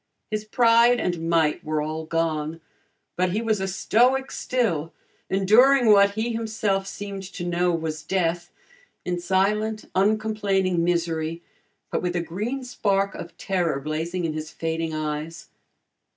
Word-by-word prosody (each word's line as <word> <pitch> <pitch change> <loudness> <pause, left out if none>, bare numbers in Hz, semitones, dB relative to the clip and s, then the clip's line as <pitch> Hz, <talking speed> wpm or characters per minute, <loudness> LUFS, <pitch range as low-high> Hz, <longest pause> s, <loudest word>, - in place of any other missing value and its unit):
His 215 0 -2
pride 235 +2 +4
and 165 -2 -2
might 160 -3 +2
were 155 0 -1
all 155 +1 -3
gone, 160 -1 -1 0.6
but 180 0 +1
he 210 - +1
was 220 -3 0
a 190 - -1
stoic 245 +7 +2
still, 170 -11 -1 0.4
enduring 225 +6 +5
what 200 0 +5
he 225 +2 -1
himself 215 -4 -1
seemed 200 -1 -6
to 190 -1 -7
know 175 0 +1
was 160 -2 -3
death, 175 +1 -1 0.5
in 175 -1 -1
silent, 210 +4 0
uncomplaining 200 -3 +1
misery 165 -1 -1 0.5
but - - -1
with 180 0 -2
a 175 - +1
green 215 +11 -4
spark 200 -5 0
of - - -9
terror 175 -7 -1
blazing 160 +5 -3
in 160 - -2
his 155 0 -5
fading 165 0 -3
eyes. 155 +2 -4
185 Hz, 140 wpm, -24 LUFS, 165-215 Hz, 0.6 s, enduring